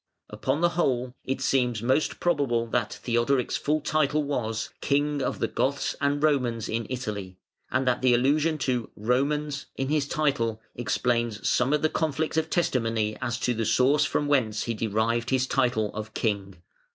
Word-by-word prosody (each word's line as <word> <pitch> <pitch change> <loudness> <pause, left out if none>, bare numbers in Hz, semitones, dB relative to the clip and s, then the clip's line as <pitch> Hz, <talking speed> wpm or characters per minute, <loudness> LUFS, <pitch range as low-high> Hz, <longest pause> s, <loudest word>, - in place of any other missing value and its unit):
Upon 130 +8 -1
the 175 - +4
whole, 130 -8 0
it 130 0 -3
seems 125 -4 +1
most 130 +5 +1
probable 140 -9 +1
that 115 -2 -1
Theodoric's 120 +2 +1
full 150 +1 0
title 150 0 +1
was 115 -6 -2
"King 145 +1 +1
of - - -1
the - - 0
Goths 140 +1 -1
and 145 +1 +1
Romans 125 -7 +1
in 115 0 -2
Italy" 105 -7 -5 0.3
and 130 0 0
that 125 -1 +2
the 125 -2 +5
allusion 150 +6 +2
to 125 -3 -1
"Romans" 140 +6 0
in 135 0 -2
his 150 -2 +1
title 135 -8 0
explains 120 -1 -1
some 125 +3 +2
of 150 0 +1
the - - +5
conflict 155 0 -1
of 160 0 0
testimony 115 -10 0
as 120 -1 -1
to 125 - +1
the 115 0 -2
source 135 +6 +3
from 145 0 0
whence 120 -7 +1
he 115 - -2
derived 115 +2 0
his 130 -1 +2
title 120 -5 +1
of 110 +1 -7
King. 100 -4 -1
125 Hz, 170 wpm, -26 LUFS, 115-145 Hz, 0.3 s, the